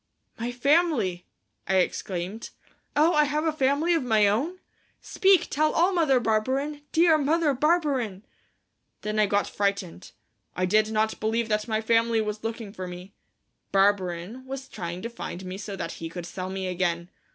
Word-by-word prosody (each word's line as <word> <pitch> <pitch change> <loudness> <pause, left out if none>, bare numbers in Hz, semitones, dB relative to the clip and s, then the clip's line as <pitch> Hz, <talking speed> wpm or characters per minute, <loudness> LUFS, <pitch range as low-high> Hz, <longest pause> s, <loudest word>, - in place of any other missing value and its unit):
"My 235 +2 -2
family," 245 - +1 0.4
I 190 - +1
exclaimed. 185 +2 -2 0.5
"Oh, 315 +3 +4
have 300 +1 +2
I - - +3
a - - -2
family 290 +4 +2
of 330 - +2
my 220 -5 +3
own? 275 - 0 0.4
Speak, 385 -3 +3
tell 305 +1 +1
all, 355 +4 +3
Mother 310 -7 +3
Barberin, 260 +7 0
dear 325 -1 +4
Mother 305 +1 +2
Barberin!" 270 - 0 0.8
Then 215 0 -2
I 210 - +4
got 205 +1 +1
frightened. 200 - -2 0.5
I 185 - +1
did 215 +3 +3
not 220 0 0
believe 225 +1 0
that 210 +1 0
my 220 -1 0
family 230 0 +2
was 215 0 -3
looking 225 -2 -5
for 185 -2 -6
me. 180 +2 -9 0.6
Barberin 195 +3 +1
was 270 0 -6
trying 175 +1 -6
to 230 - -3
find 185 -5 -7
me 185 +1 -6
so 205 -1 -6
that - - -4
he 165 - -7
could 175 +1 -7
sell 185 +1 -5
me 190 0 -4
again. 175 -1 -1
220 Hz, 165 wpm, -26 LUFS, 190-285 Hz, 0.8 s, Oh